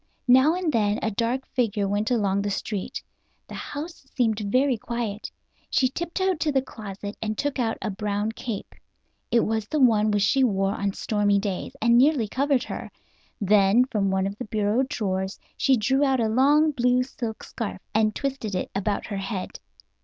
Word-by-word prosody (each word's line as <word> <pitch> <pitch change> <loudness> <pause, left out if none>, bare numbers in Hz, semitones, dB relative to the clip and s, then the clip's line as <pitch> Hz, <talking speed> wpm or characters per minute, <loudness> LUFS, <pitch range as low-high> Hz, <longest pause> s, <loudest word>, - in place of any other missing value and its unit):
Now 260 +6 +6
and 355 -4 -1
then 210 -2 +2
a 220 - 0
dark 235 +5 -1
figure 215 -5 0
went 205 +2 0
along 200 -5 +1
the 205 - -2
street. 200 -1 -4 0.4
The - - -10
house 295 -1 -7
seemed 225 -4 +1
very 255 +6 +2
quiet. 225 -2 -4 0.4
She 255 - +2
tiptoed 345 +4 -1
to 310 -2 +1
the 265 -2 +1
closet 205 -4 -8
and 215 -1 -2
took 290 -2 -1
out 225 -2 0
a 215 - -1
brown 205 +2 -2
cape. 225 -2 -6 0.6
It 235 0 +4
was 220 -1 -1
one 230 -8 +4
which 205 -1 +2
she 265 +6 +3
wore 195 -4 +1
on 200 -1 -2
stormy 205 -1 +1
days, 200 -2 -3
and 235 +1 +5
nearly 270 -4 +3
covered 270 +2 +1
her. - - -6 0.5
Then 205 +3 +4
from 205 -6 0
one 190 0 +1
of 200 +1 -3
the 250 - -4
bureau 215 +2 +1
drawers 190 -6 -2 0.2
she 265 -2 +3
drew 265 +6 +2
out 265 -2 +2
a 225 - +2
long 290 +6 +4
blue 250 -2 +2
silk 235 -4 -6
scarf, 215 -4 -5
and 215 -1 +2
twisted 270 -8 -3
it 180 - -3
about 200 +1 -1
her 205 - -4
head. 195 -1 -4
220 Hz, 180 wpm, -25 LUFS, 205-260 Hz, 0.6 s, Now